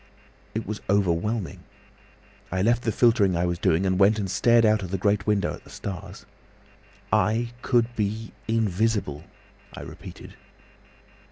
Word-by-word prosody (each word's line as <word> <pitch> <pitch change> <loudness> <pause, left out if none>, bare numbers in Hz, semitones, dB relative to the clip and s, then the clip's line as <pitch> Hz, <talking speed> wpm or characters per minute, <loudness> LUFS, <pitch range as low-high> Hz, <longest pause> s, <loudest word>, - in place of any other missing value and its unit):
It 110 - -2
was 105 +1 -5
overwhelming. 100 +1 0 0.9
I 95 0 0
left 120 +2 +3
the 115 - 0
filtering 105 -5 +3
I 85 - +1
was 85 -1 -2
doing, 85 +3 +2
and 95 0 +1
went 100 +2 +5
and 100 -3 -2
stared 115 +1 +4
out 110 -1 +3
of 95 - -5
the 95 - -1
great 100 +1 +1
window 105 -2 +1
at - - -11
the - - -17
stars. 95 -3 -7 0.9
'I 115 +2 +2
could 120 -1 +1
be 110 +1 -2 0.2
invisible!' 110 -7 0 0.5
I - - -7
repeated. - - -10
105 Hz, 150 wpm, -25 LUFS, 95-115 Hz, 0.9 s, went